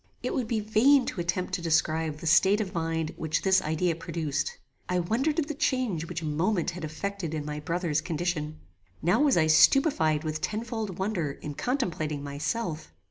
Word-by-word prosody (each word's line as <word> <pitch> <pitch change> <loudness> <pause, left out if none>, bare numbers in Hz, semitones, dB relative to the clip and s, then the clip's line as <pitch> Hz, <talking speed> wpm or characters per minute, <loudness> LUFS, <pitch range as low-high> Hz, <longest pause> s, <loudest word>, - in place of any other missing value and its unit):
It - - -2
would 250 -4 -1
be 225 -1 0
vain 240 +6 +4
to 175 - -3
attempt 180 +2 -2
to 180 - -1
describe 160 -1 +1
the 160 - -9
state 190 +6 +5
of 200 -3 -3
mind 165 -2 -2
which 155 -1 -1
this 190 -1 +4
idea 160 +2 0
produced. 155 -3 -3 0.3
I 180 - +1
wondered 235 - 0
at 310 -3 0
the 305 - -3
change 255 - -1
which 170 -1 -5
a - - -3
moment 170 +4 0
had 175 -1 -8
affected 165 +1 -4
in 150 -1 -4
my 150 0 -4
brother's 165 -1 -1
condition. 155 -2 -2 0.5
Now 175 - +3
was 290 -7 +4
I 160 - +4
stupified 160 - +4
with 155 0 -3
tenfold 220 -3 -3
wonder 190 -7 -1
in 150 - -7
contemplating 165 - -2
myself. 155 +4 -3
170 Hz, 185 wpm, -28 LUFS, 155-215 Hz, 0.5 s, state